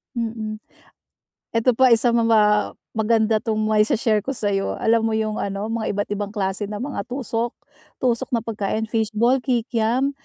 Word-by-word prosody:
Mm. 220 -2 -3 1.0
Eto 230 +2 +4
pa 260 +3 +4
isa 235 +1 +2
ma 230 -1 +2
pa 225 -2 +5 0.6
maganda 220 0 +3
tong 220 -1 -2
mai-she-share 215 +1 +2
ko 270 - -2
sa 205 -2 -1
'yo. 195 0 -1
Alam 230 0 +2
mo 220 - -1
yung 215 -1 -1
ano 200 +2 -3
mga 225 -1 -2
iba't 205 0 -2
ibang 205 0 -3
klase 200 -1 -2
ng 210 +2 -5
mga 265 -6 -4
tusok, 240 -2 -2 0.5
tusok 235 -2 +1
na 230 - 0
pagkain, 220 -1 -2
fishball, 225 +4 +2
kikiam, 245 +1 0
225 Hz, 165 wpm, -22 LUFS, 215-235 Hz, 1.0 s, pa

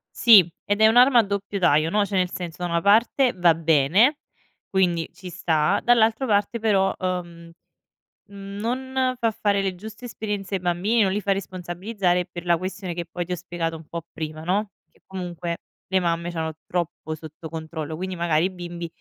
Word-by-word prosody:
Sì, 215 -8 +7 0.2
ed 205 +1 -1
è 220 - +6
un'arma 245 +3 +6
a - - -4
doppio 200 0 -3
taglio, 160 -4 +3
no; 205 +2 +2
cioè 200 - -5
nel 180 -1 +2
senso 175 -2 -6
da 175 - -1
una 170 0 +1
parte 230 +6 +3
va 175 -3 +4
bene, 165 - +3 0.5
quindi 175 -4 +1
ci 185 -1 -10
sta, 160 -3 +1
dall'altra 230 +1 +3
parte 205 +2 +1
però, 195 -3 +2
uhm, 175 -2 -5 0.8
mhmm, 200 0 -9
non 255 +3 -1
fa 230 -2 +1
fare 200 -2 0
le 190 -1 -1
giuste 215 +6 -10
esperienze 205 -4 -5
ai 190 - -1
bambini, 180 +6 +1
non 195 -2 +3
li 205 +2 -1
fa 200 - 0
responsabilizzare 185 0 -1
per 175 0 -7
la 175 -1 +4
questione 185 +1 -5
che 170 0 -5
poi 175 +1 -4
ti 180 - -8
ho - - +1
spiegato 170 -2 -4
un 160 -1 -14
po' 170 +1 -6
prima, 155 0 -6
no: 200 +5 0 0.2
che - - -30
comunque 175 -2 -5 0.3
le 190 0 +2
mamme 170 -1 -1
c'hanno 160 -1 -3
troppo 170 -2 -3
sotto 155 +1 -10
controllo, 160 -1 -5
quindi 185 +3 -4
magari 170 -2 +1
i - - 0
bimbi 175 -1 -6
180 Hz, 190 wpm, -24 LUFS, 170-205 Hz, 0.8 s, Sì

